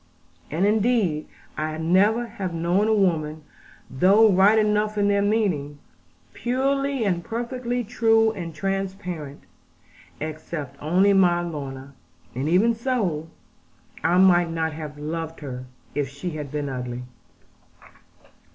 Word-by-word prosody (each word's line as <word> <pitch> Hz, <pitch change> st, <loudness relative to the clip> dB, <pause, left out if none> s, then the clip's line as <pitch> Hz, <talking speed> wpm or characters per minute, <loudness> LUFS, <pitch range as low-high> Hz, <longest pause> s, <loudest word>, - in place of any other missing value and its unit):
And 170 Hz, +6 st, 0 dB
indeed 210 Hz, -7 st, +1 dB, 0.3 s
I 155 Hz, 0 st, -3 dB
never 195 Hz, +8 st, +3 dB
have 190 Hz, -6 st, -5 dB
known 175 Hz, +5 st, +1 dB
a 220 Hz, -, +3 dB
woman 160 Hz, -6 st, 0 dB, 0.4 s
(though 200 Hz, +11 st, +5 dB
right 195 Hz, +4 st, +5 dB
enough 210 Hz, 0 st, +1 dB
in 205 Hz, 0 st, +2 dB
their 200 Hz, 0 st, +2 dB
meaning) 195 Hz, -9 st, 0 dB, 0.6 s
purely 275 Hz, +1 st, 0 dB
and 175 Hz, -3 st, 0 dB
perfectly 245 Hz, +2 st, -3 dB
true 225 Hz, 0 st, +3 dB
and 170 Hz, -6 st, -7 dB
transparent, 185 Hz, -5 st, -4 dB, 0.8 s
except 155 Hz, -2 st, -6 dB
only 185 Hz, +6 st, +3 dB
my 175 Hz, -3 st, +4 dB
Lorna; 140 Hz, -4 st, -6 dB, 0.4 s
and 135 Hz, +5 st, -2 dB
even 205 Hz, +7 st, +4 dB
so, 215 Hz, -, -2 dB, 0.7 s
I 175 Hz, +2 st, +3 dB
might 175 Hz, -2 st, +5 dB
not 160 Hz, -1 st, -2 dB
have 150 Hz, -1 st, -7 dB
loved 160 Hz, +2 st, -5 dB
her, 130 Hz, -3 st, -6 dB, 0.3 s
if 145 Hz, -2 st, -1 dB
she 140 Hz, +6 st, -5 dB
had 150 Hz, -3 st, -6 dB
been 150 Hz, -1 st, -2 dB
ugly. 125 Hz, -2 st, -5 dB
180 Hz, 125 wpm, -24 LUFS, 155-210 Hz, 0.8 s, though